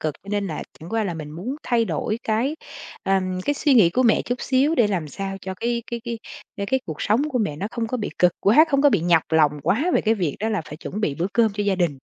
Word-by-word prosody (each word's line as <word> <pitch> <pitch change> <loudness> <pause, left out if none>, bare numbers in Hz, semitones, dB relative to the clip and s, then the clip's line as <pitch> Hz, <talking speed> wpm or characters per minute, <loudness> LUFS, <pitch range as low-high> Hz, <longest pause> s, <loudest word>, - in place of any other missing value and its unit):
cực. 155 -2 -2
Cho 200 - -16
nên 205 -1 -1
là 155 -5 -4 0.2
chẳng 160 - -10
qua 225 +2 0
là 175 -4 -3
mình 155 -2 -7
muốn 195 - -5
thay 235 -2 +1
đổi 210 +5 -2
cái, 240 +8 0 0.5
ờm, 185 -1 0
cái 290 - +1
suy 285 -1 +2
nghĩ 200 -9 +6
của 255 - +1
mẹ 235 -3 +3
chút 245 - -2
xíu, 275 +4 +2
để 240 -8 +4
làm 180 -7 -2
sao 195 +5 -5
cho 190 +1 -5
cái 235 +4 -2
cái 235 0 -3
cái 235 -1 -4 0.4
cho 200 - -3
cái 265 +5 +1
cuộc 155 -2 -5
sống 255 +9 +2
của 255 - -1
mẹ 200 -10 -1
nó 195 - -3
không 235 -1 -2
có 255 - -2
bị 215 - -3
cực 180 -1 +4
quá, 235 +11 +6
không 275 -2 +2
có 290 - +6
bị - - +2
nhọc 170 -1 +3
lòng 155 -2 +4
quá 250 - +1
về - - +4
cái 220 0 +2
việc 175 -9 -2
đó 220 - 0
là 210 -4 0
phải 150 - -9
chuẩn 195 +5 -6
bị 155 -10 0
bữa 170 +5 -1
cơm 225 -3 +3
cho 205 +1 -2
gia 200 -1 +1
đình. 170 -7 0
205 Hz, 285 wpm, -23 LUFS, 175-235 Hz, 0.5 s, nghĩ